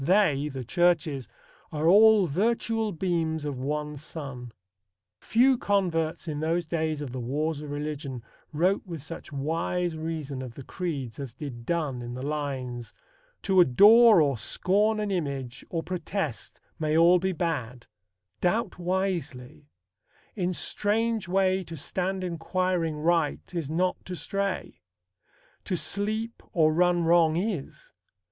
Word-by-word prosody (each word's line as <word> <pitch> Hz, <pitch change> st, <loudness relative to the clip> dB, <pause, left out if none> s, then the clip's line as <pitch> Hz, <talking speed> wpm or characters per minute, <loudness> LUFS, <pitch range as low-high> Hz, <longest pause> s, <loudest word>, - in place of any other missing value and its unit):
They" 155 Hz, -4 st, +3 dB
(the 135 Hz, -2 st, -5 dB
churches) 160 Hz, -, +1 dB, 0.4 s
"are 155 Hz, +1 st, 0 dB
all 210 Hz, +2 st, +7 dB
virtual 220 Hz, +6 st, 0 dB
beams 165 Hz, -3 st, -1 dB
of 140 Hz, -3 st, -4 dB
one 150 Hz, +2 st, -3 dB
sun." 135 Hz, -5 st, -7 dB, 0.7 s
Few 250 Hz, +2 st, +3 dB
converts 170 Hz, -6 st, 0 dB
in 150 Hz, -2 st, -3 dB
those 165 Hz, +2 st, 0 dB
days 160 Hz, -2 st, -1 dB
of 140 Hz, -4 st, -5 dB
the 130 Hz, -, -5 dB
wars 145 Hz, +5 st, -2 dB
of 150 Hz, -, -7 dB
religion 145 Hz, -4 st, -4 dB, 0.3 s
wrote 180 Hz, +6 st, +2 dB
with 165 Hz, -6 st, -7 dB
such 165 Hz, 0 st, -8 dB
wise 165 Hz, +4 st, -1 dB
reason 155 Hz, -4 st, -4 dB
of 125 Hz, -3 st, -8 dB
the 140 Hz, -, -8 dB
creeds 145 Hz, -7 st, -4 dB
as 135 Hz, -5 st, -6 dB
did 120 Hz, -6 st, -8 dB
Donne 150 Hz, -7 st, -1 dB
in 120 Hz, 0 st, -6 dB
the 130 Hz, -, -6 dB
lines: 135 Hz, -5 st, -4 dB, 0.5 s
To 190 Hz, -3 st, +5 dB
adore 210 Hz, -, +7 dB
or 140 Hz, -5 st, 0 dB
scorn 210 Hz, -, +1 dB
an 210 Hz, -1 st, -2 dB
image, 140 Hz, -8 st, -3 dB
or 165 Hz, -2 st, -2 dB
protest, 180 Hz, -, -4 dB, 0.2 s
May 155 Hz, 0 st, +1 dB
all 175 Hz, +2 st, +6 dB
be 190 Hz, +2 st, 0 dB
bad; 140 Hz, -9 st, -3 dB, 0.5 s
doubt 180 Hz, +3 st, 0 dB
wisely; 175 Hz, -7 st, -3 dB, 0.7 s
in 185 Hz, -3 st, 0 dB
strange 215 Hz, +3 st, 0 dB
way 190 Hz, +1 st, +2 dB
To 165 Hz, 0 st, -8 dB
stand 185 Hz, +5 st, -2 dB
inquiring 175 Hz, -1 st, -1 dB
right, 165 Hz, +2 st, 0 dB
is 165 Hz, -5 st, -3 dB
not 180 Hz, +3 st, 0 dB
to 185 Hz, -, -5 dB
stray; 195 Hz, +4 st, -3 dB, 0.8 s
To 185 Hz, -, -1 dB
sleep 215 Hz, +5 st, -1 dB
or 155 Hz, -2 st, +4 dB
run 175 Hz, +1 st, +3 dB
wrong 165 Hz, -1 st, +4 dB
is. 215 Hz, -, -4 dB
165 Hz, 140 wpm, -27 LUFS, 145-185 Hz, 0.8 s, all